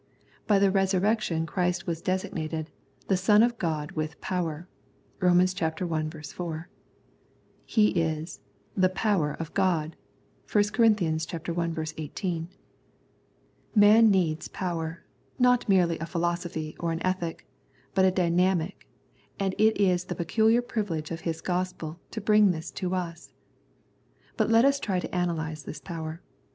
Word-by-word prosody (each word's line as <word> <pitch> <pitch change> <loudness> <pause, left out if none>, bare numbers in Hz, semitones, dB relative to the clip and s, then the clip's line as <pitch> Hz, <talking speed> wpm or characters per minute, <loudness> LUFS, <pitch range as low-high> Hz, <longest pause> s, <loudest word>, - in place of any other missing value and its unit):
By 205 - +5
the 195 0 +4
Resurrection 195 -2 +1
Christ 180 +1 -1
was 165 -2 -3
designated 160 -4 -3 0.2
" - - -34
the 195 - +3
Son 205 +4 +5
of 235 -1 +1
God 155 -2 -2
with 155 -3 -4
power 170 -2 -3 0.3
" - - -36
(Rom. 180 -2 +4
i. - - +5 0.8
4). 160 +2 -6 1.0
He 210 -2 +4
is 160 -1 -2 0.2
" - - -37
the 185 -1 +4
power 185 -6 +1
of 165 -1 -7
God 170 -5 +1 0.3
" - - -23
(i 205 - +6
Cor. 220 +3 +2 0.8
i. 160 -1 -3
18). 165 +2 -3 1.3
Man 215 +2 +7
needs 170 -6 +1
power, 170 -2 -4 0.3
not 250 -3 +3
merely 175 -4 +3
a 165 - -4
philosophy 170 -2 -2
or 170 -1 -1
an 165 +2 -3
ethic, 185 -3 -2 0.5
but 190 - +3
a 190 - +6
dynamic, 180 0 0 0.5
and 195 -1 0
it 220 -1 +4
is 180 -3 +2
the - - -4
peculiar 220 +7 +2
privilege 195 -11 -3
of 165 - -4
His 165 -1 -3
Gospel 180 -3 -3
to - - -5
bring 210 -1 +5
this 160 -3 -3
to 185 -1 -2
us. 170 -2 -5 1.0
But - - +1
let 230 +2 +5
us 280 0 +3
try 190 -7 -1
to 180 - -5
analyse 160 -3 -1
this 145 +1 -8
power. 160 +2 -6
180 Hz, 145 wpm, -27 LUFS, 165-195 Hz, 1.3 s, Man